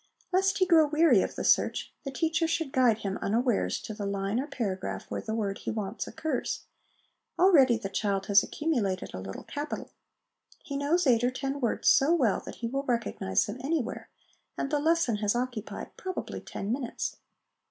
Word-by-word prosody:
Lest 385 +2 +3
he 375 - +4
grow 325 -4 +5
weary 300 - +5
of - - -3
the - - -3
search, - - +2
the - - -2
teacher 325 +3 +1
should 325 -4 -1
guide 250 -5 +4
him, 195 0 -2
unawares, 235 +2 +1
to 220 - -6
the 205 -1 -4
line 200 +3 -1
or 275 - -2
paragraph 205 -9 -3
where - - -2
the 220 - -3
word 200 -3 -2
he - - -5
wants 215 0 -3
occurs. 315 - -2 0.8
Already 295 -10 +6
the 215 -3 -4
child 195 -1 -1
has 200 0 +6
accumulated 230 - -2
a 90 - -5
little 95 0 -7
capital; 295 +1 -5 0.7
he 280 - -6
knows 305 +5 +1
eight 240 -3 +4
or 245 - +4
ten 270 +2 -3
words 235 - 0
so 290 +5 +6
well 230 - +2
that - - -6
he - - +1
will 270 +4 -1
recognise 230 - 0
them 210 +5 -6
anywhere, 285 -4 -2 0.5
and 275 - -2
the 295 - +2
lesson 320 -7 +2
has 210 +1 0
occupied 245 -3 -4
probably 370 -1 -5
ten 200 - -5
minutes. 250 -1 -3
250 Hz, 185 wpm, -29 LUFS, 210-305 Hz, 0.8 s, Already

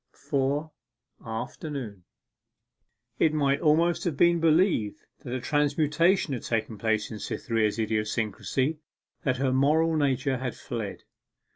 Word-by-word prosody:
4. 140 +3 -1 0.5
AFTERNOON 115 - -6 1.1
It 155 - +3
might 140 -2 +2
almost 165 +2 +3
have 165 -6 -1
been 170 +1 +4
believed 160 - +2 0.2
that 135 -3 -8
a - - -2
transmutation 150 +5 +2
had 120 - -3
taken 110 -2 -2
place 110 0 0
in 110 - -6
Cytherea's 110 -2 -1
idiosyncrasy, 110 +6 -1 0.4
that 130 -2 0
her 130 0 +1
moral 155 +5 +3
nature 135 -2 +1
had 125 -2 -3
fled. 115 -6 -6
135 Hz, 120 wpm, -27 LUFS, 115-155 Hz, 1.1 s, been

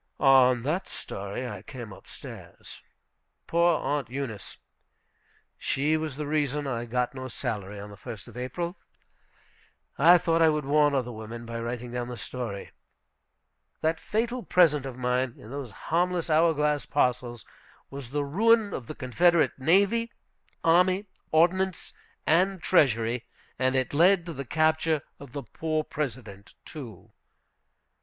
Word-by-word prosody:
On 130 -3 +5
that 160 +8 -1
story 100 +6 -5
I 105 -5 -7
came 115 -2 -9
up - - -15
stairs. - - -11 0.6
Poor 170 -1 +3
Aunt 140 -3 -2
Eunice! 125 -7 -5 1.0
She 150 +3 +1
was 155 -3 -2
the 150 +1 -4
reason 145 -1 0
I 120 -3 -2
got 125 +1 -1
no 130 -1 -6
salary 105 -6 -4
on 105 +1 -8
the - - -10
1st 110 +1 -9
of 120 - -13
April. 170 +9 -4 1.2
I 170 +5 +8
thought 165 -1 +1
I 160 - +7
would 150 -2 0
warn 145 0 +3
other 125 -2 -1
women 115 +1 -8
by 115 0 -5
writing 120 +1 -4
down 120 0 -3
the 125 -1 -6
story. 105 +1 -6 1.1
That 160 +1 +1
fatal 235 +3 -1
present 150 - +3
of 130 -2 -7
mine, 125 0 0
in 110 - -12
those 140 -3 -5
harmless 170 - -1
hourglass 150 -2 +2
parcels, 125 -4 0 0.5
was 135 -3 -7
the 145 +2 -1
ruin 215 +6 +3
of 120 - -5
the 155 - -6
Confederate 170 +6 +3
navy, 200 - +3 0.5
army, 180 +4 +4 0.3
ordinance, 180 +3 +2 0.3
and 185 +4 +3
treasury; 120 -5 +2 0.3
and 130 0 +2
it 130 +1 0
led 175 +3 +5
to 170 - -5
the 140 -1 -6
capture 155 +1 +2 0.2
of 140 -3 -12
the 140 - -4
poor 155 +6 -2
President, 120 -10 -6
too. 120 - -10
140 Hz, 145 wpm, -27 LUFS, 120-165 Hz, 1.2 s, I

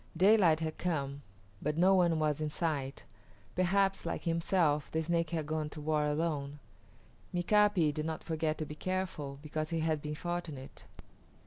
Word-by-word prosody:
Daylight 185 -4 +5
had 155 -1 -3
come, 140 -5 -2 0.4
but 150 +1 -1
no 185 +3 +5
one 175 -3 +4
was 155 -1 0
in 155 - 0
sight. 145 -4 -2 0.5
Perhaps, 195 +2 +2
like - - -3
himself, 165 -3 +1
the 160 0 -1
Snake 170 0 0
had 160 -2 -2
gone 155 0 -2
to 150 - -9
war 150 0 +1
alone. 150 -2 -1 0.7
Mika´pi 180 -3 +3
did 155 +1 -3
not 160 -1 -4
forget 160 -1 -1
to 155 - -3
be 150 - -7
careful 175 -5 -3
because 155 0 -3
he 165 -1 -1
had 155 -2 0
been 150 0 -4
fortunate. 165 -5 -5
160 Hz, 160 wpm, -32 LUFS, 150-175 Hz, 0.7 s, Daylight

